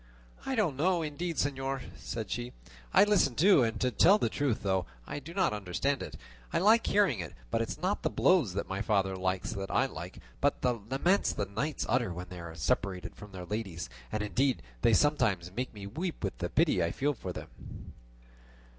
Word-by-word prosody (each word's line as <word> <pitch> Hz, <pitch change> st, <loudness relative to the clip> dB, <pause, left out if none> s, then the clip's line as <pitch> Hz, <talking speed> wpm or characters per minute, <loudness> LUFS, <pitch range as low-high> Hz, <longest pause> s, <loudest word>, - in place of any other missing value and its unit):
"I 265 Hz, -, 0 dB
don't 180 Hz, -, +1 dB
know 175 Hz, +2 st, +2 dB
indeed, 165 Hz, +3 st, -3 dB
señor," 135 Hz, -2 st, -1 dB
said -, -, -5 dB
she; -, -, -3 dB, 0.4 s
"I -, -, +7 dB
listen 205 Hz, -, +3 dB
too, 180 Hz, -, +6 dB
and 115 Hz, -1 st, 0 dB
to 125 Hz, -, +2 dB
tell 185 Hz, -, +6 dB
the -, -, 0 dB
truth, 140 Hz, -6 st, -1 dB
though 95 Hz, -2 st, +1 dB, 0.2 s
I -, -, -5 dB
do 145 Hz, +4 st, -10 dB
not 185 Hz, -, +1 dB
understand 105 Hz, +8 st, -1 dB
it, -, -, -6 dB, 0.4 s
I -, -, +1 dB
like 220 Hz, +5 st, +5 dB
hearing 195 Hz, -, +3 dB
it; 85 Hz, -3 st, -6 dB, 0.2 s
but 115 Hz, -, +1 dB
it 115 Hz, -, -2 dB
is -, -, -4 dB
not 185 Hz, +5 st, 0 dB
the -, -, +1 dB
blows 155 Hz, -, +3 dB
that 100 Hz, -, -2 dB
my 95 Hz, +1 st, -3 dB
father 95 Hz, -3 st, +1 dB
likes 95 Hz, 0 st, -1 dB
that 95 Hz, 0 st, -4 dB
I -, -, +3 dB
like, -, -, -7 dB, 0.2 s
but -, -, +1 dB
the 125 Hz, -1 st, +3 dB, 0.2 s
laments 175 Hz, +9 st, +2 dB
the 100 Hz, -, -1 dB
knights 140 Hz, +10 st, -2 dB
utter 120 Hz, -6 st, +1 dB
when 90 Hz, +1 st, -6 dB
they 90 Hz, -, -8 dB
are 85 Hz, -1 st, -8 dB
separated 95 Hz, +1 st, -1 dB
from 105 Hz, -1 st, -11 dB
their 90 Hz, -2 st, -7 dB
ladies; 100 Hz, -5 st, -4 dB, 0.2 s
and 105 Hz, -1 st, -1 dB
indeed 130 Hz, +5 st, +1 dB, 0.2 s
they 115 Hz, -, +5 dB
sometimes 110 Hz, -, +2 dB
make 125 Hz, +2 st, -2 dB
me 100 Hz, -2 st, -9 dB
weep 160 Hz, -, -4 dB
with 95 Hz, -, -3 dB
the 85 Hz, -, -2 dB
pity 150 Hz, -, +3 dB
I 85 Hz, -, +1 dB
feel 145 Hz, +2 st, 0 dB
for 95 Hz, -7 st, -6 dB
them." -, -, -7 dB
125 Hz, 210 wpm, -31 LUFS, 95-155 Hz, 0.4 s, I